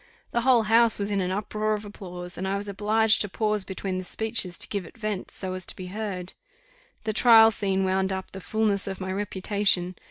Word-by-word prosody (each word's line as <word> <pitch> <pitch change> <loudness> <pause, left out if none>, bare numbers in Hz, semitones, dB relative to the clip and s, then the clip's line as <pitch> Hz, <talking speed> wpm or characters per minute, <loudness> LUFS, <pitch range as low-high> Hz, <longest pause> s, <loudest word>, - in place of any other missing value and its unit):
The 235 - 0
whole 245 -2 +4
house 225 +1 +4
was 205 0 -2
in 200 -1 +1
an 180 - -1
uproar 215 +2 -1
of 210 0 -7
applause; 180 -3 -6
and 190 - -4
I 195 +1 0
was 205 +1 -5
obliged 215 +2 +2
to 205 - +3
pause 210 0 -1
between 190 -1 -4
the - - -5
speeches 215 -3 -1
to - - +1
give 200 -2 -3
it 170 - -14
vent, 215 -4 -4
so 185 -1 -2
as 185 0 -5
to - - -3
be 185 - -7
heard. 195 -4 -5 0.7
The 215 0 -1
trial 225 0 +7
scene 195 -3 0
wound 190 0 0
up 190 0 -5
the 190 - -8
fulness 210 -1 +1
of 190 -1 -5
my 190 0 -4
reputation. 195 -2 +1
200 Hz, 220 wpm, -26 LUFS, 190-215 Hz, 0.7 s, trial